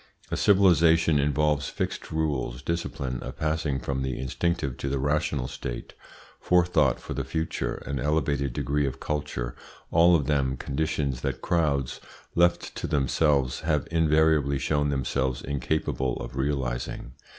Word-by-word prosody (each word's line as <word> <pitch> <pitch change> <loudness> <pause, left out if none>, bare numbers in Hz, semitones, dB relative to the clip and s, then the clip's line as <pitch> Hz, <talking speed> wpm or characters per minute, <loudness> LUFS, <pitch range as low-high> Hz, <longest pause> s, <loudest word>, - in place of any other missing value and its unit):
A - - 0
civilisation 85 -6 +4
involves 75 0 +1
fixed - - -4
rules, 70 -6 -2
discipline, 70 -6 -3
a - - -5
passing 75 -3 -1
from 65 -1 -3
the 65 -1 -2
instinctive 70 +1 -1
to 70 - -3
the 70 - 0
rational 70 -1 0
state, 65 -3 -6 0.5
forethought 85 -6 +3
for - - -6
the 70 - -2
future, 70 -3 -2
an 70 -1 -3
elevated 70 -1 0
degree 70 +3 0
of 65 - -5
culture - - -3 0.4
all 85 +2 +6
of 75 -4 +1
them 65 -2 +1
conditions 70 -2 -2
that - - -3
crowds, 70 -7 0 0.3
left 85 0 +2
to - - -3
themselves, 70 -2 +2
have 75 -2 0
invariably 80 -3 +3
shown 75 +1 0
themselves 65 -2 -1
incapable 70 -2 -1
of - - -7
realising. 65 -3 -2
70 Hz, 140 wpm, -27 LUFS, 65-80 Hz, 0.5 s, all